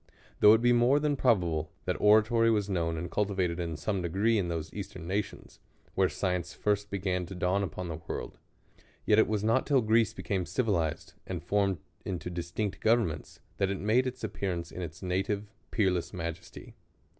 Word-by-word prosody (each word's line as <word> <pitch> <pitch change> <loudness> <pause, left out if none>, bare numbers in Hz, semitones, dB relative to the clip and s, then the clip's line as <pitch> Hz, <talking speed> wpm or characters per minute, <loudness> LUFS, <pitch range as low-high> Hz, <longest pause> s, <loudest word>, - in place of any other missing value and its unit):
Though 105 +1 +8
it 115 - -1
be 120 0 +5
more 120 +4 +4
than 150 -1 +1
probable, 85 - +1 0.2
that 90 - -2
oratory 110 +2 +5
was 105 -3 +1
known 85 -4 -1
and 85 +2 -5
cultivated 95 -4 0
in 85 -3 -3
some 95 +4 -1
degree 100 +6 +1
in 90 - -1
ihose 80 -2 -4
eastern 95 -4 -7
nations, 100 +3 -4 0.3
where 95 -1 +3
science 90 -3 -2
first 105 0 0
began 90 -2 -2
to 95 - -8
dawn 90 +2 +1
upon 90 -1 -4
the 80 -2 -4
world; - - -5 0.7
yet 105 0 +5
it - - +5
was 105 -1 -1
not 115 +4 +2
till 140 -3 +4
Greece 110 0 +3
became 95 -4 -2
civilized 85 -6 -1
and - - -4
formed 100 -2 +1 0.3
into 90 -1 -4
distinct 90 +4 -3
governments, 110 -8 0 0.2
that 95 - +1
it 100 - -2
made 115 +6 +2
its 130 -1 -6
appear 100 -3 -2
ance 85 -1 -5
in 90 - -6
its 85 +2 -7
native, 100 +3 -1 0.2
peerless 95 -5 0
majesty. 85 -2 -7
95 Hz, 180 wpm, -30 LUFS, 90-110 Hz, 0.7 s, Though